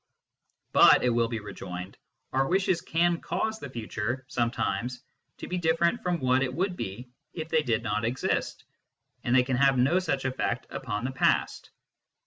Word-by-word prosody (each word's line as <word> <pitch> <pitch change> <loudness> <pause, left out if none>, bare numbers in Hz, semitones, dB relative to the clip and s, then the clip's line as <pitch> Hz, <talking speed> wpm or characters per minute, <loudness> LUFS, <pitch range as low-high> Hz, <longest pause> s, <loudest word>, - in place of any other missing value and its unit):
" - - -50
But/ - - +7
it 125 - +3
will 115 0 +2
be 115 -1 -3
rejoined, 90 -2 -7 0.2
" - - -44
our 135 +1 +2
wishes 185 -1 +1
can 170 +1 +1
cause 220 +6 -2
the 140 - -7
future, 115 +1 -4
sometimes, 120 0 -2 0.3
to - - -7
be 180 - -2
different 170 +5 +2
from 180 -1 -1
what 130 -1 +2
it 135 -1 0
would 180 +6 -1
be 120 - -6 0.2
if 160 -1 -5
they 160 - +3
did 115 -5 0
not 105 0 -1
exist, 120 +3 -1 0.6
and 120 - +1
they 130 - +6
can 125 0 -1
have 135 0 +4
no 140 +9 +3
such 135 -8 -2
effect 130 -1 -1
upon 105 +3 -4
the 130 - -1
past." 130 - +1
130 Hz, 180 wpm, -28 LUFS, 115-165 Hz, 0.6 s, But